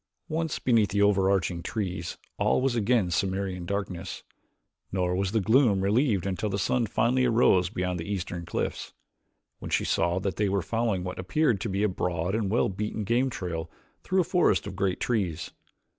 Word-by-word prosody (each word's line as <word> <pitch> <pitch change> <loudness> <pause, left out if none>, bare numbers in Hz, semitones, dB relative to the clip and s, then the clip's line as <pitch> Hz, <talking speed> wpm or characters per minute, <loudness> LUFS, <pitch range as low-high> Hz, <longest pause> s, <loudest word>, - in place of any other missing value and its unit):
Once 160 0 -1
beneath 115 -5 +2
the 100 0 0
over 100 -2 +3
arching 90 -3 0
trees 90 -4 -4 0.2
all - - +3
was 130 -1 +1
again 110 -4 +2
Cimmerian 95 +1 -1
darkness, 95 -2 -4 0.7
nor 90 -1 0
was 95 0 0
the 110 - +2
gloom 110 -2 +4
relieved 105 -1 +2
until 100 +2 -2
the 100 - -1
sun 115 +4 +1
finally 120 +5 +2
arose 110 -7 +4
beyond 90 -2 -2
the 85 +5 -5
eastern 90 -3 -3
cliffs, 85 - -3 0.7
when - - -7
she - - +1
saw 85 +1 +1
that 95 0 -2
they 105 -1 +1
were 95 -2 0
following 115 -2 -1
what 90 0 -5
appeared 115 - +1
to 115 - -2
be 100 +2 0
a - - +4
broad 90 -1 -2
and 110 -3 0
well 115 - +2
beaten 105 +2 -3
game 120 +5 +1
trail 85 -7 -4 0.3
through 185 0 +1
a - - +1
forest 175 - +2
of 100 -1 -6
great 95 -1 0
trees. 95 - -1
100 Hz, 185 wpm, -27 LUFS, 90-115 Hz, 0.7 s, gloom